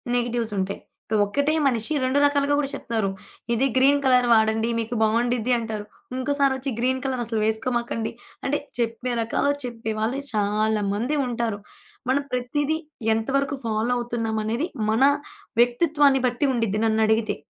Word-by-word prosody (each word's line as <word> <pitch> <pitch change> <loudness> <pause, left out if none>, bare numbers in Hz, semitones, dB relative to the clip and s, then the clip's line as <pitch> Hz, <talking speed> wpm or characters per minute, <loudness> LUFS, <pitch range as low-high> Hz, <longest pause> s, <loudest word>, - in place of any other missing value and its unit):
Negatives 240 -2 -1
ఉంటాయి. 190 +1 -2 0.2
ఇప్పుడు 215 -1 0
ఒకటే 285 +9 0
మనిషి 235 +3 -1
2 260 +2 +2
రకాలుగా 285 0 +2
కూడా 275 -2 -1
చెప్తారు. 220 -4 -2 0.4
ఇది 240 +3 +2
గ్రీన్ 280 +2 +5
కలర్ 250 -1 +4
వాడండి 220 +1 +3
మీకు 230 +2 -3
బాగుండిద్ది 235 +2 +1
అంటారు, 220 -2 -4 0.3
ఇంకోసారొచ్చి 275 0 0
గ్రీన్ 260 +1 +1
కలర్ 255 -2 -1
అసలు 225 -1 0
వేసుకోమాకండి 230 0 -1 0.3
అంటే 290 +2 +1 0.2
చెప్పే 235 +2 -1
రకాలు, 225 +5 +1
చెప్పే 230 -2 -4
వాళ్ళు 240 +6 -1
చాలా 210 +1 +1
మంది 250 +9 -1
ఉంటారు. 230 -4 -2 0.5
మనం 280 +2 +2
ప్రతీది 290 +5 0 0.4
ఎంతవరకు 275 +5 0
ఫాలో 225 +2 0
అవుతున్నాం 230 -2 -2
అనేది 235 +10 -1 0.2
మన 225 +4 +3 0.6
వ్యక్తిత్వాన్ని 280 +1 +3
బట్టి 245 +4 0
ఉండుద్ది 225 -3 0
నన్నడిగితే. 220 0 +2
240 Hz, 135 wpm, -24 LUFS, 220-270 Hz, 0.6 s, గ్రీన్